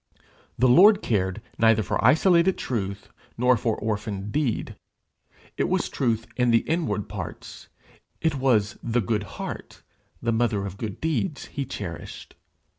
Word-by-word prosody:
The 130 - +4
Lord 200 - +7
cared 95 -4 -1 0.2
neither 115 -1 +4
for - - -2
isolated 170 - +4
truth 100 -5 -4 0.3
nor 125 +2 +4
for 115 -1 -1
orphaned 105 -2 -3
deed. 140 -5 -1 0.8
It - - 0
was - - 0
truth 115 -4 -1
in 125 -1 +2
the 115 -1 +3
inward 160 - -1
parts, - - -8 0.5
it 160 -2 +1
was 120 -6 +1
the 120 +1 0
good 105 +1 -1 0.2
heart, - - -7 0.4
the 115 - -1
mother 110 -4 +1
of 100 0 -7
good 110 -4 -5
deeds, 160 0 -1
he 140 - -2
cherished. 95 - -7
115 Hz, 140 wpm, -25 LUFS, 105-135 Hz, 0.8 s, Lord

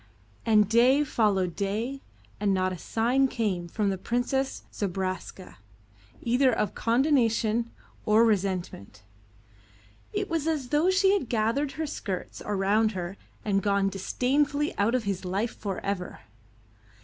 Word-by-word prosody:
And 210 -2 +5
day 250 +6 +4
followed 200 - +1
day 220 +7 -2 0.4
and 200 -1 +2
not 185 0 0
a - - -6
sign 245 +8 +1
came 200 -9 -2
from 200 +3 0
the 190 - -4
Princess 245 +5 -1
Zobraska 185 - -4 0.7
either 250 +2 +3
of 210 -4 -1
condonation 235 -3 +2 0.3
or 215 +2 +5
resentment. 180 - -2 1.1
It - - -2
was 325 -2 -1
as 295 -6 -1
though 305 +6 +3
she 385 +1 +4
had 370 - -1
gathered 235 +6 0
her 315 - -3
skirts 195 -10 -5
around 210 +2 +1
her 180 0 -4 0.3
and 195 -2 +1
gone 200 -1 +2
disdainfully 285 +9 0
out 220 +5 +2
of 250 - 0
his 195 -3 -3
life 195 +5 -2
for 195 -3 -4
ever. 195 -2 -3
220 Hz, 135 wpm, -27 LUFS, 195-260 Hz, 1.1 s, And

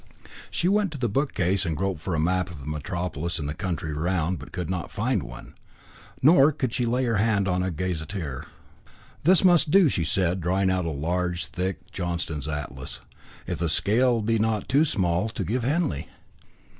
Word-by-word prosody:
She 175 - 0
went 200 -1 +2
to - - -5
the 125 -3 0
bookcase, 100 -6 +1
and 80 -4 -2
groped 95 -4 -2
for 85 0 -2
a - - 0
map 90 +3 +1
of 80 -5 -9
the 70 - -10
Metropolis 85 +2 -3
and 75 -3 -3
the 75 - -2
country 80 -3 -3
round, 85 +2 0
but - - -11
could 90 -2 -4
not 90 -4 -3
find - - 0
one. - - -10 0.7
Nor 150 0 +7
could 130 -5 -2
she 125 -2 0
lay 125 +3 +1
her 115 -4 +1
hand 105 -2 +2
on 90 0 +1
a 95 - 0
gazetteer. 85 -3 -4 0.8
"This 185 +2 +6
must 175 -4 +5
do," 180 -4 +5
said 90 +1 +1
she, - - -6
drawing 95 +2 +1
out 90 -2 0
a - - -1
large, 85 +4 -1
thick 95 +1 -4
Johnston's 85 -5 -3
Atlas, 75 -4 -5 0.4
"if - - -4
the 85 -1 0
scale 115 +7 +2
be 115 +1 +1
not 110 -1 0
too 145 +4 +4
small 90 - 0
to - - -4
give 120 +2 -1
Henley." 120 - 0
90 Hz, 190 wpm, -26 LUFS, 85-115 Hz, 0.8 s, Nor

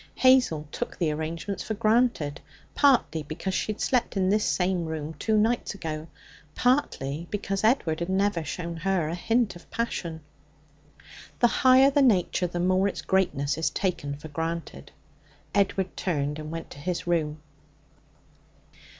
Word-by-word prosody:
Hazel 255 - +4
took - - -5
the 165 -4 +1
arrangements 165 +6 -4
for 220 - -3
granted, 215 - +1 0.3
partly 265 - +3
because 155 +6 -4
she 215 - 0
had 215 - -7
slept 245 -5 0
in 185 -1 +2
this 210 +1 +2
same 180 -2 0
room 160 -1 -4
two 220 -1 +1
nights 225 0 +1
ago, 160 -4 -5 0.5
partly 170 - 0
because 195 -1 -2
Edward 215 -9 +2
had 170 +1 -3
never 190 -3 +1
shown 170 +2 -5
her 180 -2 0
a - - -3
hint 225 +4 0
of 175 - -14
passion. 170 -8 -3 1.2
The - - +3
higher 260 +3 +5
the 285 - +3
nature, 190 -7 +3
the 175 0 -4
more 185 +2 +2
its 200 - -4
greatness 150 -7 +1
is 165 - +1
taken 145 -7 -2
for 155 +2 -10
granted. 165 +2 -5 0.6
Edward 195 -2 +1
turned 150 -4 -2
and 155 0 -6
went 165 +1 -6
to - - -10
his 175 +3 -3
room. 155 -3 0
180 Hz, 150 wpm, -26 LUFS, 160-215 Hz, 1.2 s, higher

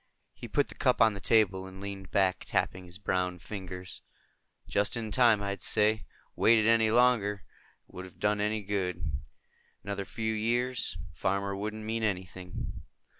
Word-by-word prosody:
He - - -9
put - - +1
the - - -9
cup - - +1
on 110 -1 +6
the 100 - -6
table 95 -4 +3
and 95 0 -11
leaned 100 -2 -6
back, 95 0 +1
tapping 95 0 -1
his 85 0 -11
browned 90 -2 -1
fingers. 95 -3 -7 0.7
"Just 100 +3 +1
in 110 -2 -3
time, 115 -3 +4
I'd 100 -2 -3
say. 105 -2 +2 0.3
Waited 110 -1 +5
any 115 -1 +5
longer, 110 -4 +3 0.4
it - - -23
wouldn't 90 0 -8
have - - -28
done 105 0 +1
any 105 0 0
good. 90 -7 -2 0.6
Another 100 -1 -3
few 110 0 -2
years, 120 +3 0 0.2
a - - -22
farmer 100 +4 -1
wouldn't 105 +2 -4
mean 115 +1 -1
anything." 95 -3 -4
100 Hz, 165 wpm, -30 LUFS, 95-110 Hz, 0.7 s, on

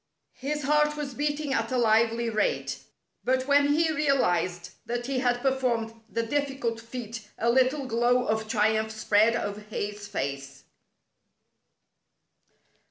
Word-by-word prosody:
His 295 +3 -3
heart 300 +1 +2
was 285 -3 -4
beating 290 +1 -1
at 230 -2 -1
a 255 - +1
lively 230 0 +3
rate, 230 - -1 0.4
but 260 0 +1
when 285 +1 +4
he 315 +2 +2
realized 180 - +1 0.2
that 240 0 -2
he 265 0 -1
had 245 -1 +1
performed 250 -4 0 0.2
the 230 0 -1
diffi 275 +3 -2
cult 230 -2 -1
feat 230 -2 -7
a 235 +1 +2
little 260 +3 +2
glow 245 +1 +2
of 220 -1 -1
triumph 220 0 +1
spread 220 +1 +3
over 205 -3 -3
his 210 -1 -5
face. 140 -6 -5
240 Hz, 135 wpm, -27 LUFS, 220-275 Hz, 0.4 s, when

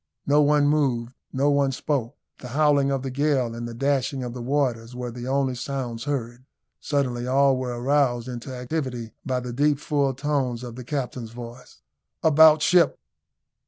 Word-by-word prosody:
No 145 +2 +4
one 145 0 +4
moved 130 -5 +1 0.2
no 140 +2 +2
one 140 -1 +2
spoke 135 -1 -2 0.2
the 125 - -8
howling 145 -2 +4
of 135 -1 -1
the 135 - -4
gale 135 -3 +1
and 120 0 -5
the 120 - -7
dashing 135 0 0
of 120 -1 -5
the 125 - -6
waters 125 -3 -1
were 125 -1 -4
the 120 +1 -7
only 135 -1 +1
sounds 120 -2 -4
heard. 125 -3 -3 0.4
Suddenly 125 -4 -1
all 135 +1 +4
were 125 -2 -3
aroused 130 -2 +1
into 125 +1 -6
activity 125 -3 -4
by 130 -2 -1
the 125 -1 -6
deep 145 +3 +2
full 140 -2 0
tones 130 -4 -1
of 120 -2 -7
the 125 - -8
captain's 125 -4 -4
voice. 120 +1 -11 0.4
"About 155 0 +6
ship!" 175 +1 +4
130 Hz, 170 wpm, -24 LUFS, 120-145 Hz, 0.4 s, About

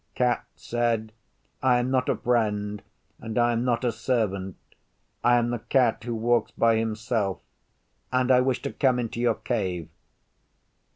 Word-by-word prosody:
Cat 125 -1 +1
said, 115 -2 -1 0.5
'I 130 -2 +4
am 120 +1 -1
not 130 -1 +1
a - - +2
friend, 105 -4 0 0.4
and 110 0 -6
I 120 0 +4
am 115 0 0
not 125 0 0
a 120 - +2
servant. 100 -6 -1 0.7
I 120 +1 +5
am 120 0 +1
the 120 - -2
Cat 120 0 +1
who 120 -1 -2
walks 115 0 +1
by 115 -1 +2
himself, 110 -2 -1 0.7
and 130 0 +2
I 125 0 +6
wish 130 -1 0
to - - -4
come 130 -3 +2
into 115 -1 -3
your 120 -2 +2
cave. 95 -9 -3
120 Hz, 160 wpm, -26 LUFS, 110-125 Hz, 0.7 s, I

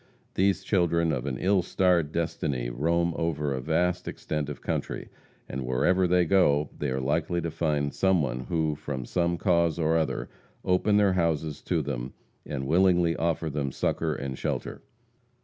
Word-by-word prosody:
These 95 0 +2
children 85 -4 +2
of 65 -1 -2
an 65 -2 -2
ill 95 0 +2
starred 85 -3 +2
destiny 65 -7 -2
roam 85 +6 +1
over 75 -4 -1
a 65 - -3
vast 90 +5 0
extent 75 -2 -3
of 75 - -6
country. - - -3 0.4
And 65 +1 -4
wherever 90 +9 +2
they 90 0 +3
go, 75 -6 +3
they - - -1
are 65 +1 -1
likely 80 +6 0
to 85 -1 -3
find 75 -3 -1
some 95 -1 +3
one 65 -3 -2
who, 80 +2 0
from 70 -3 -5
some 85 -1 0
cause 85 -3 +2
or 80 -1 +1
other, 80 - -1 0.4
open 95 +3 +3
their 100 -2 +4
houses 80 -4 -1
to - - 0
them - - -4 0.3
and 70 -2 -3
willingly 85 +1 +3
afford 80 -2 -1
them 70 -2 -1
succor 80 +4 -1
and 65 -1 -5
shelter. - - -3
80 Hz, 165 wpm, -27 LUFS, 70-90 Hz, 0.4 s, their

